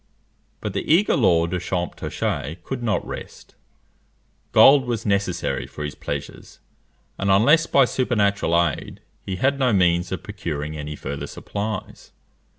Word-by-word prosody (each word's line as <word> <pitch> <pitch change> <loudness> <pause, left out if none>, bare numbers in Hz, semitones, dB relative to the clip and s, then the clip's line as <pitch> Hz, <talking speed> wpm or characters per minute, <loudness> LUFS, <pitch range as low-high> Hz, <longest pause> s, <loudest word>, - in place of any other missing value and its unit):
But - - -4
the - - -2
eager 185 +6 +4
Lord 85 -7 +3
of 90 - -1
Champtocé 85 -3 -3
could 130 -2 -5
not 105 -7 0
rest. - - -9 1.0
Gold 135 -1 +7
was 115 -3 -3
necessary 100 -3 -1
for 75 - -7
his 75 -2 -4
pleasures; - - -7 0.6
and 100 - 0
unless 145 +13 +5
by 135 -2 +5
supernatural 100 -9 +1
aid, 75 - -7 0.2
he 95 - -4
had 135 +8 +1
no 130 -2 +3
means 90 -2 +2
of 95 - -4
procuring 80 -7 -5
any 75 0 -5
further 70 0 -5
supplies. 105 0 -6
100 Hz, 140 wpm, -23 LUFS, 85-120 Hz, 1.0 s, Gold